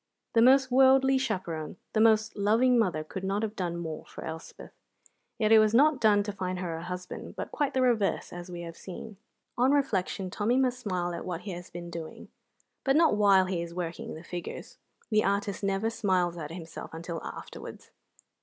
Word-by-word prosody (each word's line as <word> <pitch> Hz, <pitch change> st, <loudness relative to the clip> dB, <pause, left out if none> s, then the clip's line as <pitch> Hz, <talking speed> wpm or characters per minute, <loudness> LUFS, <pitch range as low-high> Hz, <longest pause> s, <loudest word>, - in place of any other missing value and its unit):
The 230 Hz, -, +5 dB
most 260 Hz, +1 st, +5 dB
worldly 265 Hz, +1 st, +5 dB
chaperon, 175 Hz, -10 st, -3 dB, 0.2 s
the 215 Hz, -, +3 dB
most 220 Hz, 0 st, +4 dB
loving 230 Hz, +5 st, +3 dB
mother, 175 Hz, -8 st, +1 dB
could 185 Hz, +4 st, -7 dB
not 195 Hz, +3 st, -1 dB
have 220 Hz, -1 st, -3 dB
done 175 Hz, -3 st, -2 dB
more 160 Hz, -2 st, -5 dB
for -, -, -9 dB
Elspeth. 160 Hz, 0 st, -8 dB, 0.7 s
Yet 215 Hz, -1 st, +1 dB
it 220 Hz, -, +9 dB
was 215 Hz, +1 st, +3 dB
not 290 Hz, 0 st, +5 dB
done 205 Hz, -2 st, +5 dB
to 205 Hz, -, -3 dB
find 185 Hz, -2 st, -3 dB
her 175 Hz, -2 st, -3 dB
a 165 Hz, -, -6 dB
husband, 180 Hz, +1 st, -7 dB
but -, -, -5 dB
quite 290 Hz, -3 st, -1 dB
the 260 Hz, -, +3 dB
reverse, 225 Hz, -6 st, +1 dB
as 175 Hz, +1 st, -8 dB
we 175 Hz, -1 st, -6 dB
have 165 Hz, -1 st, -7 dB
seen. 200 Hz, +4 st, -9 dB, 0.4 s
On 255 Hz, +2 st, +4 dB
reflection 195 Hz, -8 st, 0 dB
Tommy 220 Hz, +6 st, +1 dB
must 255 Hz, -1 st, +1 dB
smile 180 Hz, -6 st, -2 dB
at 170 Hz, -, -5 dB
what 175 Hz, -2 st, -4 dB
he 205 Hz, -, -6 dB
has 175 Hz, 0 st, -8 dB
been 175 Hz, 0 st, -8 dB
doing, 165 Hz, -2 st, -8 dB, 0.5 s
but 270 Hz, 0 st, +2 dB
not 320 Hz, -6 st, +5 dB
while 200 Hz, -3 st, +5 dB
he 185 Hz, -2 st, -2 dB
is 170 Hz, 0 st, -7 dB
working 170 Hz, -2 st, -4 dB
the 160 Hz, -, -10 dB
figures. 175 Hz, 0 st, -7 dB, 0.3 s
The 215 Hz, 0 st, +4 dB
artist 200 Hz, 0 st, -1 dB
never 195 Hz, +3 st, 0 dB
smiles 185 Hz, -5 st, +1 dB
at 155 Hz, -3 st, -6 dB
himself 165 Hz, -1 st, -8 dB
until 165 Hz, 0 st, -5 dB
afterwards. -, -, -9 dB
195 Hz, 195 wpm, -29 LUFS, 175-225 Hz, 0.7 s, it